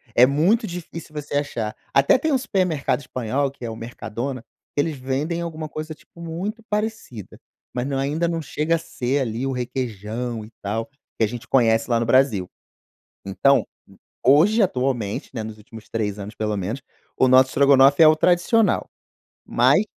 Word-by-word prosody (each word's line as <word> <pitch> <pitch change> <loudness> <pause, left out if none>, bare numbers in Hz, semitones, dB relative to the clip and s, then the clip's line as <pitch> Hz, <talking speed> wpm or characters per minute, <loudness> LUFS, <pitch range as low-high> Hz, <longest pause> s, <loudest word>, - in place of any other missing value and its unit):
É 125 - +8
muito 170 - +2
difícil 170 -4 -8
você 145 -1 -5
achar. 115 -7 -2 0.2
Até 140 - +5
tem 310 +3 -1
um 270 - +4
supermercado 180 - 0
espanhol, 130 +2 -2
que 135 - -14
é - - -3
o 110 - -6
Mercadona, 120 +2 -5 0.3
eles 150 +2 0
vendem 140 +6 -2
alguma 160 -2 -5
coisa, 155 +1 -6
tipo, 170 - -17
muito 185 +7 -5
parecida, 210 - -4 0.3
mas, 125 +1 -2
não, 140 - -2
ainda 150 +5 0
não 165 -1 -2
chega 155 +3 0
a - - +1
ser 135 -4 -2
ali 120 0 -2
o 135 - -1
requeijão 120 -2 -4
e 110 - -16
tal, 110 +3 -2 0.3
que 115 - +2
a - - +3
gente 120 +2 -8
conhece 115 -2 +3
lá 115 -1 +3
no 115 - 0
Brasil. 115 -7 +3 0.8
Então 140 +8 +3 0.6
hoje, 180 - +5
atualmente, 125 - -1
né, 115 - -3
nos 110 0 -8
últimos 110 0 -13
3 105 -2 -2
anos 100 +2 -7
pelo 105 -1 -2
menos, 105 +8 -3 0.4
o 130 - +5
nosso 130 +1 +6
estrogonofe 140 +2 +5
é 155 - +9
o 155 - +5
tradicional, 180 +7 +2 0.6
mas 210 - +4
135 Hz, 170 wpm, -22 LUFS, 115-160 Hz, 0.8 s, é